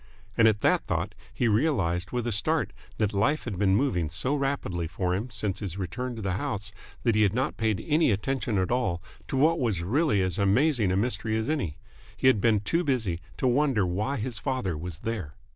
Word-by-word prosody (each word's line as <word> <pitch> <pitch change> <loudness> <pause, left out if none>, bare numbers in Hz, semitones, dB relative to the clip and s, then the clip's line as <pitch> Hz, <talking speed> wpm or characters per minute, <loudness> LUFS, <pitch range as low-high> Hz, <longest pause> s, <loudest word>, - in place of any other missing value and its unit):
And 115 - +6
at 105 -1 +2
that - - +2
thought - - -1 0.2
he 120 - 0
realised 100 - +1
with 120 -2 -2
a 120 - -1
start 100 -3 +1 0.2
that 105 -1 0
life 110 +10 +1
had 105 -7 -5
been 95 -2 +3
moving 100 - +1
so 85 - -1
rapidly 135 - -1
for 90 +2 -1
him 105 +7 -2
since 105 -4 -2
his 95 -4 -5
return 120 +7 -4
to 110 - -6
the 95 -1 -1
house 100 0 -3 0.3
that 115 - +3
he 110 - +3
had 105 0 +3
not 130 +1 0
paid 110 -3 -1
any 155 0 +3
attention 120 +2 0
at 95 +2 0
all 120 -9 0 0.3
to 135 - -2
what 160 +5 +4
was 105 -9 0
really 115 - +2
as 95 0 -1
amazing 110 +1 +3
a 95 - +1
mystery 110 0 0
as 110 - -2
any. 125 - -1 0.4
He - - -3
had 130 -6 +5
been 110 -2 +3
too 165 +11 0
busy 110 - 0 0.2
to - - -2
wonder 130 -5 +3
why 105 +10 -1
his 115 +1 -3
father 130 - -1
was 85 +1 -7
there. 100 -10 -4
110 Hz, 210 wpm, -27 LUFS, 95-130 Hz, 0.4 s, And